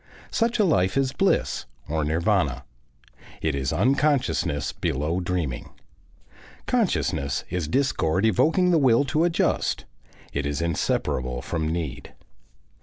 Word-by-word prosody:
Such 230 +1 +1
a 215 - +4
life 95 - +2
is 135 -1 +2
bliss, 195 - 0 0.2
or 80 0 -1
nirvana. 80 - 0 0.7
It 80 -1 -1
is 65 -1 -1
unconsciousness 130 - +1
below 75 +6 -1
dreaming. 85 -8 -3 0.9
Consciousness 70 +1 0
is 90 -4 -2
discord 100 - +1
evoking 165 - +3
the 165 - +4
will 130 -2 +4
to 155 +4 +1
adjust; 170 -1 0 0.5
it 70 0 -1
is 70 -1 -2
inseparable 65 -6 -1
from 80 -2 -2
need. 80 -6 -5
90 Hz, 115 wpm, -25 LUFS, -, 0.9 s, a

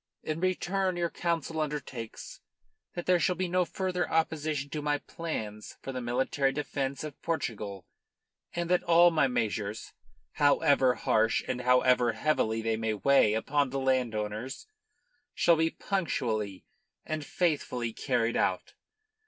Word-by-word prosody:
In 155 +1 -3
return 185 +1 0
your 170 -1 -1
Council 165 -2 -2
undertakes 135 -6 -5 0.6
that 175 - -4
there 180 -1 +4
shall 180 +1 +2
be 185 +1 -1
no 180 +1 +2
further 185 0 -2
opposition 155 -3 -1
to 150 - -3
my 145 0 +1
plans 110 -11 -6
for 135 - -4
the 130 -1 -4
military 130 +3 0
defence 140 -1 -3
of 150 -2 -8
Portugal, 105 - -3 0.7
and 170 0 -1
that 180 - +4
all 170 +1 +6
my 155 -4 +3
measures 110 -4 -2 0.4
however 140 -3 +3
harsh 110 +1 +2
and 125 - -2
however 125 -1 +4
heavily 115 -7 0
they 110 -1 0
may 110 -1 -1
weigh 110 -2 +4
upon 140 +5 +1
the 135 - -3
landowners, 120 -2 -1 0.7
shall 170 -1 +4
be 160 +1 +2
punctually 115 - -2 0.4
and 155 -1 -3
faithfully 140 -9 -1
carried 120 -3 0
out. - - 0
140 Hz, 135 wpm, -29 LUFS, 115-165 Hz, 0.7 s, all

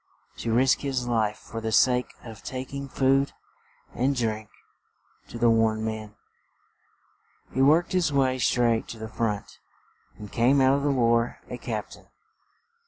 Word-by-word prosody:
To 115 - -3
risk 130 +3 +3
his 130 -3 -2
life 110 -3 0
for 115 - -8
the 110 0 -3
sake 125 +2 +3
of 115 -3 -10
tak 130 +1 -6
ing 140 0 -5
food 135 +1 +2 0.6
and 135 +3 0
drink 110 -3 -2 0.8
to - - -8
the 115 0 +4
worn 110 -1 +2
men. 110 -1 -5 1.4
He 130 - 0
worked 155 +6 +4
his 180 -5 +1
way 130 -2 +1
straight 120 -2 +2
to 115 - -8
the 110 0 -6
front 105 -2 -3 0.6
and 105 -1 -10
came 125 +4 +3
out 130 0 +5
of - - -2
the 145 - 0
war 120 -3 +2
a - - -5
cap - - -4
tain. - - -14
120 Hz, 160 wpm, -26 LUFS, 110-135 Hz, 1.4 s, out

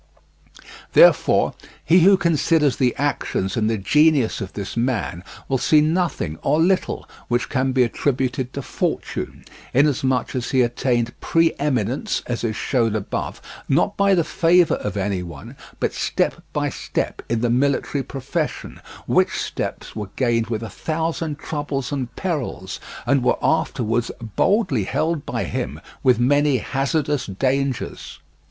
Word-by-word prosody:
Therefore, - - +5 0.3
he 175 +3 +6
who 190 +3 +6
considers 160 -4 +2
the 125 -3 +2
actions 140 -8 -1
and 110 -2 +1
the 115 - 0
genius 140 - +3
of 95 -1 -6
this 100 -2 -5
man 115 -7 -1 0.2
will 135 -1 0
see 155 - +4
nothing, 155 - 0
or 155 - +2
little, 185 +3 +1 0.2
which 120 0 0
can 130 +1 +1
be 130 -1 +4
attributed 130 +1 -1
to 140 - -4
fortune, - - -3 0.3
inasmuch 130 -2 +2
as 125 -2 -2
he 130 -2 +3
attained 120 -1 0
pre 165 0 +3
eminence, 135 - -1
as 120 -1 -3
is 110 -2 -1
shown 115 -4 0
above, 105 -3 -4 0.3
not 175 +8 +2
by 200 -1 +4
the 170 - +3
favour 170 +1 +3
of 105 0 -4
any 95 -1 -1
one, 85 -2 -9 0.2
but - - 0
step - - -1
by - - 0
step - - -3
in 115 -1 0
the 120 -1 +1
military 140 +2 +1
profession, 140 +5 -4 0.2
which - - +2
steps - - -4
were 105 -3 -5
gained 115 -3 +1
with 115 -1 -3
a - - -4
thousand 160 +2 -3
troubles 145 -3 -3
and 130 -4 -3
perils, 140 - -3 0.3
and 140 -3 +2
were 125 - +2
afterwards 115 +1 +1 0.3
boldly 185 - +2
held 160 - -1
by - - -2
him 70 +5 -4 0.2
with 130 -3 +4
many 145 +3 +3
hazardous 140 +3 -1
dangers. 130 +5 -2
130 Hz, 145 wpm, -22 LUFS, 115-150 Hz, 0.3 s, he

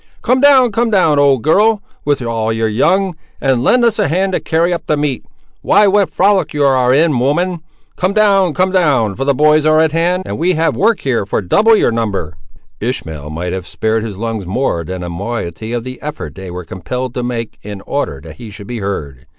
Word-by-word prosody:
Come 255 +1 +2
down—come 250 -5 +4
down, 170 -8 +3
old 140 -4 +3
girl, 210 +7 +3 0.3
with 145 -3 0
all 115 -1 -1
your 110 0 0
young; 175 - +1 0.2
and 130 -3 +1
lend 245 - +3
us 230 -2 +1
a - - +2
hand 185 +5 0
to - - +1
carry 170 +2 0
up 170 - -5
the 150 - +1
meat;—why, 145 - -1
what 200 0 +3
a - - -34
frolic 195 -4 +1
you 145 -1 +2
ar' 130 -2 +3
in, 150 -1 +3
woman! 170 +7 0 0.4
Come 185 +1 0
down, 200 -5 +3
come 185 +1 +1
down, 140 - +2
for 135 +6 -4
the 140 -1 +2
boys 150 +2 +4
are 155 0 +4
at 160 -1 +3
hand, 175 +3 0
and - - -5
we 180 +3 +2
have 165 0 0
work 220 +1 +1
here 125 -6 0
for 100 - -2
double 215 - +3
your - - +2
number." 100 -9 -3 0.4
Ishmael 80 - -5
might 85 +3 -4
have 95 -1 -5
spared 110 0 -1
his 105 -3 -6
lungs 110 -3 -4
more 95 -4 -1
than 90 +2 -6
a - - -5
moiety 100 +2 -5
of 120 -1 -2
the 130 +1 -8
effort 150 +1 -6
they 95 -1 -9
were 90 0 -7
compelled 115 +10 -5
to 125 - -3
make 120 -2 -4
in 100 -1 -8
order 135 - -3
that 80 -1 -11
he 115 - -9
should 105 0 -10
be 120 +2 -5
heard. 70 -10 -5
135 Hz, 215 wpm, -15 LUFS, 110-180 Hz, 0.4 s, down—come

